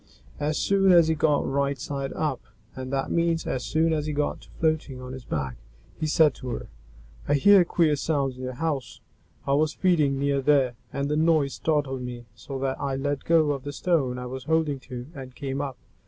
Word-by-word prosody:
As 150 +1 0
soon 195 -1 +3
as 170 -2 +6
he - - +3
got 150 -1 +2
right 140 0 0
side 140 -1 -4
up 150 -5 -2 0.3
(and 130 0 -6
that 135 -1 -1
means 170 -1 +1
as 125 - -2
soon 160 +1 +1
as 155 -1 -1
he 150 - -2
got 145 0 -1
to - - -18
floating 155 -5 0
on 125 0 -7
his 130 -2 -9
back), 65 -5 -3 0.4
he 155 - -1
said 155 0 +4
to 130 - -9
her, - - -5 0.6
"I 145 - +3
heard 190 +4 +6
queer 160 -4 +3
sounds 140 -3 -1
in 130 - -10
your 130 0 -4
house; 140 -2 -3 0.5
I 140 - +1
was 155 +2 +2
feeding 155 -7 +2
near 140 0 +1
there, 135 -3 +3 0.2
and 140 0 -2
the 150 - 0
noise 155 -3 +3
startled 145 -4 -1
me 120 -1 -6
so 110 +6 -7
that 135 0 -2
I 135 -1 -1
let 145 +1 -2
go 160 -3 +4
of 140 -2 -3
the 145 - -4
stone 145 -6 0
I 125 - -5
was 130 +1 -6
holding 155 -3 +1
to, 125 -1 -6
and 130 -4 -9
came 135 -1 -3
up. 135 -3 -4
140 Hz, 215 wpm, -26 LUFS, 130-155 Hz, 0.6 s, as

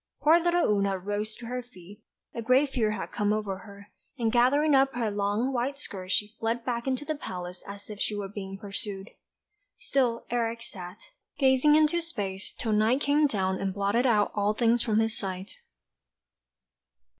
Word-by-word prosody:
Poor 320 +3 +6
little 345 0 +2
Oona 200 -2 +1
rose 205 +3 -3
to 240 - -10
her 250 +2 -3
feet; 205 -3 -15 0.3
a 235 - -4
great 260 +4 +3
fear 225 -5 +1
had 215 - -4
come 205 0 0
over 210 -3 -2
her; 200 -1 -13 0.3
and 230 -3 +1
gathering 285 +6 +4
up 270 -1 +4
her 230 -3 0
long 205 +6 0
white 260 +3 -1
skirts 185 -9 -6
she 210 +2 +1
fled 230 +1 -1
back 240 0 -2
into 265 +2 -1
the 310 - -1
palace 180 -10 -7
as 200 0 -9
if 210 -2 -8
she 210 - -1
were 205 -1 -3
being 195 -1 -7
pursued. 200 0 -5 0.7
Still 245 -4 0
Eric 230 -1 -1
sat, 185 - -10 0.3
gazing 270 +2 +5
into 310 +2 +3
space, 205 - -3
till 225 - -3
night 220 +6 +3
came 295 +1 +3
down 190 -6 -1
and 195 -1 -2
blotted 205 +6 +2
out 210 -4 +3
all 205 0 +1
things 235 +1 +3
from 220 -3 +1
his 225 0 +2
sight. 190 -2 -5
220 Hz, 180 wpm, -28 LUFS, 200-255 Hz, 0.7 s, Poor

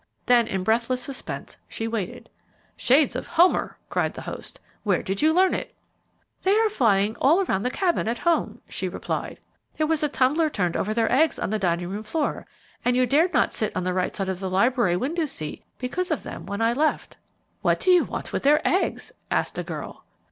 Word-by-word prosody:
Then 240 -2 +4
in 190 -3 -2
breathless 235 +5 +1
suspense 275 - -6
she 225 - -4
waited. 225 -5 -4 0.5
"Shades 275 +2 +3
of - - -4
Homer!" 345 +2 +3
cried - - -1
the - - -7
host. - - -8 0.2
"Where 195 -5 +1
did 195 +1 -2
you 310 - +5
learn 370 +3 +4
it?" - - -4 0.7
"They 385 +2 +3
are 445 0 +3
flying 220 - +2
all 340 +8 +4
through 190 - 0
the 245 - -1
Cabin 350 - 0
at 235 +1 -1
home," 340 +4 0
she - - -3
replied. - - -4 0.4
"There 310 - +2
was 315 0 +1
a 300 - +1
tumbler 295 +5 +2
turned 180 - -1
over 210 - -1
their 230 -1 +1
eggs 305 +5 +3
on - - -3
the 215 - 0
dining 175 -2 0
room 205 +3 -4
floor, 295 +7 -2 0.4
and 245 0 +2
you 255 - +4
dared 310 +8 +3
not - - +3
sit 215 - -2
on 185 - -1
the 180 0 -1
right 180 0 -1
side 195 -1 -2
of 185 -1 -3
the 190 -1 -3
library 195 -1 +2
window 310 - -1
seat 155 - -4
because 355 +9 -3
of - - -1
them - - -8
when 200 +3 -2
I 230 +1 +3
left." 305 +5 -1 0.4
"What - - +2
do 370 - +3
you 360 -1 +6
want - - -6
with - - -1
their 295 +2 +3
eggs?" 375 - 0 0.2
asked - - -1
a - - -2
girl. - - -7
250 Hz, 210 wpm, -25 LUFS, 200-315 Hz, 0.7 s, you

